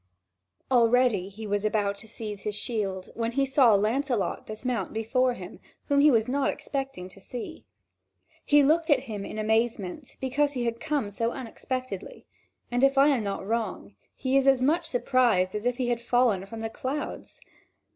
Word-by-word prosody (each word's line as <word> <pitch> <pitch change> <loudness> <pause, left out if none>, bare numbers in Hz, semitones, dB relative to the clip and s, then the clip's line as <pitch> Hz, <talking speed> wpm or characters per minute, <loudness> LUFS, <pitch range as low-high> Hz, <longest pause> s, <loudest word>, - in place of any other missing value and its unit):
Already 235 -5 +3
he 215 +3 -9
was 205 0 -1
about 210 -1 +1
to 220 - -9
seize 210 -2 -7
his 210 -1 -3
shield, 205 -4 -3
when 230 0 -2
he 275 +2 +2
saw 265 -5 +5
Lancelot 230 +2 0
dismount 235 +3 -3
before 245 +3 +1
him, - - -10 0.3
whom 285 -1 +4
he 295 +2 +7
was 230 -4 +3
not 275 +2 +1
expecting 270 -10 -4
to 190 - -15
see. 245 +4 -8 0.8
He 290 0 +5
looked 320 +4 +2
at 280 -4 +4
him 215 -6 -6
in 215 - -7
amazement, 220 +2 -1
because 285 +2 0
he 245 -3 -2
had 235 0 -2
come 290 -9 -1
so 230 +3 -1
unexpectedly; 255 -3 -6 0.5
and, 245 +2 +1
if 275 0 +4
I 280 +2 +6
am 270 -5 +2
not 195 -1 -3
wrong, 210 - -3 0.2
he 265 0 -1
was 275 0 +2
as 265 -2 +4
much 325 +5 +2
surprised 240 -8 +2
as 210 +3 -2
if 245 0 0
he 250 -2 -1
had 240 -1 0
fallen 235 -5 +2
from 225 +2 -7
the 225 - -3
clouds. 275 +5 -5
240 Hz, 175 wpm, -27 LUFS, 210-265 Hz, 0.8 s, he